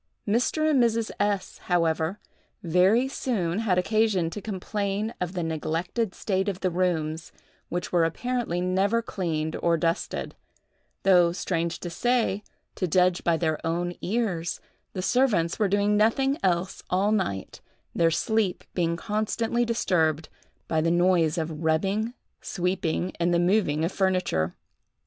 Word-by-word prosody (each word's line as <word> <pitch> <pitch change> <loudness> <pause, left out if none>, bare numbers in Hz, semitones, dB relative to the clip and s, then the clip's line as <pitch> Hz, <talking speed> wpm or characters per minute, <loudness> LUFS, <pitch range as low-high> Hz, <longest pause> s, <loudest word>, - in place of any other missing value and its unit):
Mr. 250 +8 +1
and 290 -5 +4
Mrs. 230 -1 +1
S——, 205 -2 -1
however, 165 +1 +1 0.4
very 185 +9 +3
soon 205 -9 -1
had 205 -5 +1
occasion 195 -3 +2
to 210 - -6
complain 205 +1 -3
of 180 0 -2
the 180 -2 -2
neglected 165 +6 -2
state 190 0 0
of 190 -1 -5
the 185 - +1
rooms, 165 -3 -1 0.4
which 175 0 -3
were 175 -2 +3
apparently 230 +2 -1
never 195 +5 +1
cleaned 160 -6 -2
or 170 -1 +3
dusted; 165 +3 -2 0.7
though, 180 -3 +5
strange 170 -1 -2
to 175 - -6
say, 230 0 +1 0.3
to 185 - -2
judge 180 +1 +2
by 170 -1 +2
their 160 -2 -1
own 175 +2 -1
ears, 190 -6 -1 0.3
the 185 - -3
servants 205 -9 +2
were 210 -2 +2
doing 205 +1 +2
nothing 265 +6 +3
else 180 0 0
all 195 +3 +2
night, 180 - -2 0.3
their 165 -1 +3
sleep 205 +3 0
being 170 -2 0
constantly 220 +5 -1
disturbed 165 -9 +1 0.4
by 160 -1 +1
the 165 - +1
noise 175 -2 +3
of 160 -1 -3
rubbing, 195 +9 0 0.3
sweeping, 180 -1 -1
and 170 +1 +2
the - - +3
moving 175 -4 +2
of 170 - -2
furniture. 185 - 0
185 Hz, 140 wpm, -26 LUFS, 170-210 Hz, 0.7 s, though